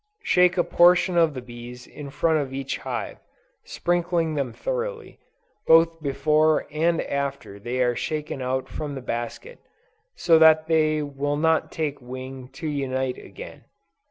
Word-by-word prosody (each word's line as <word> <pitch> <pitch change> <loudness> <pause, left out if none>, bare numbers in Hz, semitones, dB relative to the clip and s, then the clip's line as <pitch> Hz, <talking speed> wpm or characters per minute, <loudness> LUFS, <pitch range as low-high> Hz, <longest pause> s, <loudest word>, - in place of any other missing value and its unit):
Shake 180 - +3
a 175 - +4
portion 180 +1 +4
of 165 -4 +3
the 130 - -6
bees 120 0 -10
in 145 -2 -10
front 160 +2 +1
of 140 -3 -3
each 135 +1 -4
hive, - - -5 0.4
sprinkling 175 -2 -1
them 140 -5 -2
thoroughly, - - -5 0.5
both 165 0 +5
before 150 +2 +2
and 165 +2 +1
after 140 -7 -4
they 125 +4 -1
are 120 -1 +1
shaken 150 -1 -4
out 130 +1 -2
from 150 -2 -5
the 135 - -6
basket, 120 - -5 0.6
so 165 -2 +4
that 160 0 +6
they 155 -1 +2
will 145 0 -2
not 160 +1 +1
take 150 -3 -3
wing 130 +1 -8
to 160 - -6
unite 130 -3 -2
again. - - -11
150 Hz, 150 wpm, -24 LUFS, 130-165 Hz, 0.6 s, that